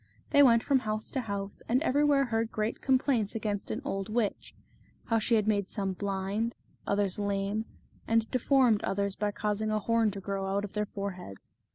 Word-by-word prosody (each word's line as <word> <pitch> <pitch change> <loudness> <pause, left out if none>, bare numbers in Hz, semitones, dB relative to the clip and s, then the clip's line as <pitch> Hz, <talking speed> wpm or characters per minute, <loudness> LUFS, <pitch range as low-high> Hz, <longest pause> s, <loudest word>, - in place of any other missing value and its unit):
They 285 - +6
went 235 -4 +6
from 275 -2 +3
house 215 -2 -3
to 265 - -1
house, 200 -3 -5
and 245 +2 +4
every 290 -1 +2
where 285 -2 +4
heard 225 -2 -1
great 215 +1 -2
complaints 255 -5 +1
against 210 -2 -3
an 245 - -3
old 195 -6 -3
witch; 220 -2 -2 0.5
how 225 -1 +1
she 230 +2 +2
had 215 -1 +1
made 200 -3 +1
some 195 -3 -2
blind, 200 +4 -2 0.3
others 200 -1 0
lame, 200 +1 -1 0.4
and 225 0 +2
de 255 - +1
formed 250 -5 +3
others 200 0 -1
by 210 0 -1
causing 210 +1 -2
a 215 - +1
horn 225 +1 +2
to 200 -1 -6
grow 195 0 -3
out 200 +1 0
of 200 - -10
their 210 0 -1
foreheads. 185 - -7
215 Hz, 195 wpm, -30 LUFS, 200-230 Hz, 0.5 s, They